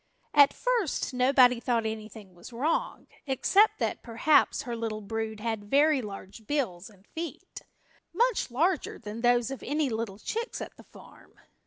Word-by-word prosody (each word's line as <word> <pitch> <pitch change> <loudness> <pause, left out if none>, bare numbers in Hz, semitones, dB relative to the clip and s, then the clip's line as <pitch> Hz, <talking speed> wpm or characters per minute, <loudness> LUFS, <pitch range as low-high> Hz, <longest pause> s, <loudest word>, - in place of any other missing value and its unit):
At 285 -2 +7
first 470 - -1
nobody 250 -1 +5
thought 235 -2 0
anything 215 -3 -7
was 175 +6 -13
wrong, 275 +8 -1 0.2
except 385 - +3
that, - - -2
perhaps, 270 +5 +2
her 240 -4 -4
little 225 -2 -4
brood 220 +1 -4
had 220 -2 -3
very 290 +1 +4
large 205 0 -9
bills 220 -12 -2
and 200 -2 -22
feet, 335 +2 -7 0.5
much 485 - +1
larger 325 +8 0
than 210 +2 -7
those 245 +1 +2
of 270 - -6
any 290 -2 -1
little 220 -3 -3
chicks 460 - -4
at - - -7
the - - -16
farm. - - -17
240 Hz, 155 wpm, -28 LUFS, 220-295 Hz, 0.5 s, At